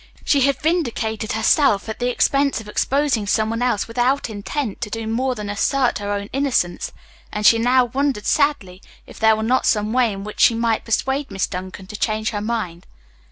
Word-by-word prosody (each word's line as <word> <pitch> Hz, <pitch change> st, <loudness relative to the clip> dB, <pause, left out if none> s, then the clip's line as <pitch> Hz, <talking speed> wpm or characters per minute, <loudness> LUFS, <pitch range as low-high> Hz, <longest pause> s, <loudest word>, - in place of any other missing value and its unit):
She 280 Hz, -, +3 dB
had 275 Hz, 0 st, +2 dB
vindicated 235 Hz, -10 st, -1 dB
herself 220 Hz, -1 st, +3 dB
at 220 Hz, -, -5 dB
the 245 Hz, 0 st, 0 dB
expense 275 Hz, +2 st, +1 dB
of 220 Hz, -, -10 dB
exposing 260 Hz, -1 st, 0 dB
some 220 Hz, +1 st, +1 dB
one 230 Hz, +1 st, -3 dB
else 245 Hz, -5 st, 0 dB
without 245 Hz, +2 st, 0 dB
intent 215 Hz, +2 st, -4 dB
to -, -, -3 dB
do 225 Hz, +1 st, -4 dB
more 250 Hz, +4 st, -1 dB
than 210 Hz, -2 st, -6 dB
assert 245 Hz, +5 st, 0 dB
her 205 Hz, 0 st, -4 dB
own 200 Hz, 0 st, -3 dB
innocence, 265 Hz, -10 st, 0 dB, 0.4 s
and 210 Hz, 0 st, -3 dB
she 230 Hz, -, +6 dB
now 250 Hz, +2 st, +4 dB
wondered 260 Hz, -2 st, -1 dB
sadly 280 Hz, -12 st, 0 dB, 0.2 s
if -, -, -13 dB
there 220 Hz, 0 st, +5 dB
were 220 Hz, -, -3 dB
not 250 Hz, +4 st, +1 dB
some 210 Hz, 0 st, +1 dB
way 250 Hz, -3 st, +3 dB
in 195 Hz, 0 st, -6 dB
which 210 Hz, +1 st, -8 dB
she 230 Hz, -, +5 dB
might 230 Hz, -1 st, 0 dB
persuade 265 Hz, +5 st, -1 dB
Miss 195 Hz, -, -1 dB
Duncan 185 Hz, +1 st, -7 dB
to 200 Hz, -, -9 dB
change 215 Hz, 0 st, -1 dB
her 205 Hz, -2 st, -3 dB
mind. 210 Hz, -6 st, -4 dB
225 Hz, 200 wpm, -21 LUFS, 210-260 Hz, 0.4 s, she